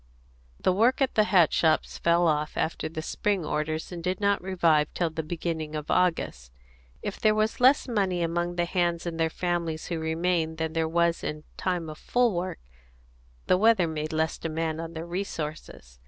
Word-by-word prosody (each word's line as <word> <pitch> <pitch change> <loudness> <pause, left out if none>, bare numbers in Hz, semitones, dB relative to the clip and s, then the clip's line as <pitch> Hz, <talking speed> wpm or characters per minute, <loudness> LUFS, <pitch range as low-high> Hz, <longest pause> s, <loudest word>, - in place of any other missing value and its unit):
The 185 - +2
work 230 +7 +3
at 270 -2 +1
the 215 - +4
hat 175 -6 +4
shops 160 -2 +1
fell 170 +1 +3
off 150 -1 0
after 160 -1 -1
the 155 0 -5
spring 200 -1 -1
orders, 155 +2 -2
and 170 -2 -6
did 185 +3 -1
not 200 -1 +2
revive 170 -5 +2
till 170 -2 0
the 160 0 -3
beginning 160 -1 -4
of 150 -1 -4
August. 160 - 0 0.5
If 205 - -4
there 215 -1 +3
was 215 +1 0
less 260 +4 +5
money 195 -7 0
among 175 +1 -1
the 175 0 +1
hands 175 -1 0
and 165 -1 -4
their 165 0 +2
families 170 -2 -2
who 170 -2 -2
remained 160 0 0
than 160 0 -2
there 160 -1 0
was 170 0 +1
in 150 0 -4
time 180 -3 -2
of 155 0 -8
full 245 -3 +2
work, 175 +2 -3 0.9
the 185 - +3
weather 220 -4 +5
made 155 -1 -3
less 160 0 -1
demand 160 0 -2
upon 165 0 -6
their 165 0 -5
resources. 155 - -6
170 Hz, 185 wpm, -27 LUFS, 160-180 Hz, 0.9 s, less